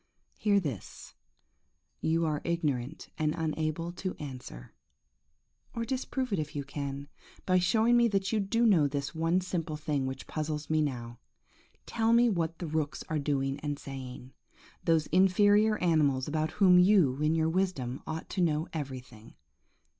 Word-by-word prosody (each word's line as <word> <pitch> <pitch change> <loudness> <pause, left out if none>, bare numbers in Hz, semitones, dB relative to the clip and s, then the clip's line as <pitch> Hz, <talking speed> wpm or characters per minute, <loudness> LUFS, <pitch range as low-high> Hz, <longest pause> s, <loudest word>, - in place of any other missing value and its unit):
Hear 205 -2 +2
this; 140 - -6 0.9
you 165 +1 +1
are 150 -2 -1
ignorant 150 -5 -2
and 155 -1 +1
unable 160 +1 -2
to 185 +1 -5
answer; 130 - -9 1.0
or 230 0 -2
disprove 260 -1 -2
it 190 - +1
if 155 -1 -5
you 145 - -2
can, 140 0 -5 0.4
by 185 -1 +3
showing 225 +6 +3
me 235 0 +5
that 195 -2 0
you 220 - +1
do 230 +4 +1
know 175 -10 +5
this 140 +1 -3
one 165 +3 +1
simple 165 -4 -3
thing 150 -3 -1
which 130 0 -6
puzzles 155 -1 -4
me 155 0 +3
now! 120 -5 -4 0.7
Tell 225 0 +1
me 240 +1 +5
what 165 -3 -1
the 175 - -5
rooks 155 -2 -2
are 155 -2 0
doing 140 -1 -1
and 145 -1 -3
saying; 130 -2 -8 0.5
those 165 -2 +2
inferior 205 +4 +4
animals 150 -8 +2
about 155 +1 -1
whom 185 -3 +6
you, 180 -8 +4
in 155 +1 +2
your 160 0 +2
wisdom, 160 -9 -1
ought 160 +1 -4
to 190 - -1
know 160 -1 +1
everything. 125 -7 -7
160 Hz, 155 wpm, -30 LUFS, 140-185 Hz, 1.0 s, whom